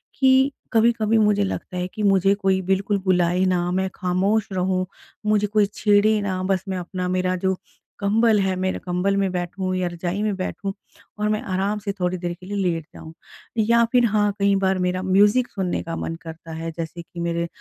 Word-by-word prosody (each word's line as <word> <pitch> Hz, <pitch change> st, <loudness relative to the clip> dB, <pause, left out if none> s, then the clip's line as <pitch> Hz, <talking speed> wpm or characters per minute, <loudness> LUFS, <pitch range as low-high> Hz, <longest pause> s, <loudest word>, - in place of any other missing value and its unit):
कि 265 Hz, +1 st, +4 dB, 0.2 s
कभी-कभी 225 Hz, -1 st, +3 dB
मुझे 210 Hz, -2 st, +3 dB
लगता 190 Hz, -1 st, -4 dB
है 180 Hz, 0 st, -1 dB
कि 215 Hz, -, -4 dB
मुझे 195 Hz, -1 st, +4 dB
कोई 190 Hz, -2 st, +1 dB
बिल्कुल 200 Hz, +2 st, +1 dB
बुलाएँ 180 Hz, 0 st, +2 dB
ना, 180 Hz, -1 st, +1 dB
मैं 190 Hz, +1 st, 0 dB
खामोश 195 Hz, +4 st, +1 dB
रहूँ, 185 Hz, 0 st, 0 dB, 0.4 s
मुझे 210 Hz, -1 st, +2 dB
कोई 210 Hz, 0 st, +3 dB
छेड़े 210 Hz, +1 st, +3 dB
ना 190 Hz, -2 st, -2 dB
बस 190 Hz, -1 st, 0 dB
मैं 190 Hz, -, -2 dB
अपना 180 Hz, +1 st, -4 dB
मेरा 185 Hz, 0 st, 0 dB
जो 190 Hz, 0 st, +2 dB, 0.4 s
कंबल 215 Hz, +2 st, +3 dB
है 190 Hz, -1 st, 0 dB
मेरा 185 Hz, 0 st, -1 dB
कंबल 180 Hz, +2 st, 0 dB
में 195 Hz, -2 st, +1 dB
बैठूँ 185 Hz, +1 st, -3 dB
या 185 Hz, -1 st, 0 dB
रजाई 175 Hz, +3 st, -3 dB
में 210 Hz, -2 st, 0 dB
बैठूँ, 195 Hz, +1 st, -4 dB, 0.4 s
और 210 Hz, 0 st, 0 dB
मैं 215 Hz, 0 st, 0 dB
आराम 195 Hz, +2 st, -1 dB
से 200 Hz, -1 st, -3 dB
थोड़ी 180 Hz, +1 st, 0 dB
देर 175 Hz, -1 st, -3 dB
के 185 Hz, -, -12 dB
लिए 205 Hz, +2 st, -4 dB
लेट 170 Hz, -5 st, -1 dB
जाऊँ। 160 Hz, -, -11 dB, 0.4 s
या 235 Hz, +2 st, +4 dB
फिर 245 Hz, -1 st, +4 dB
हाँ, 210 Hz, -2 st, +2 dB
कई 200 Hz, 0 st, +3 dB
बार 190 Hz, -1 st, +1 dB
मेरा 180 Hz, 0 st, 0 dB
म्यूजिक 205 Hz, +6 st, +4 dB
सुनने 190 Hz, -3 st, -2 dB
का 165 Hz, 0 st, -5 dB
मन 165 Hz, -, -4 dB
करता 165 Hz, +1 st, -10 dB
है 165 Hz, +1 st, -4 dB
जैसे 165 Hz, +1 st, -5 dB
कि 170 Hz, +1 st, -11 dB
मेरे 170 Hz, 0 st, -1 dB
190 Hz, 200 wpm, -23 LUFS, 180-210 Hz, 0.4 s, कि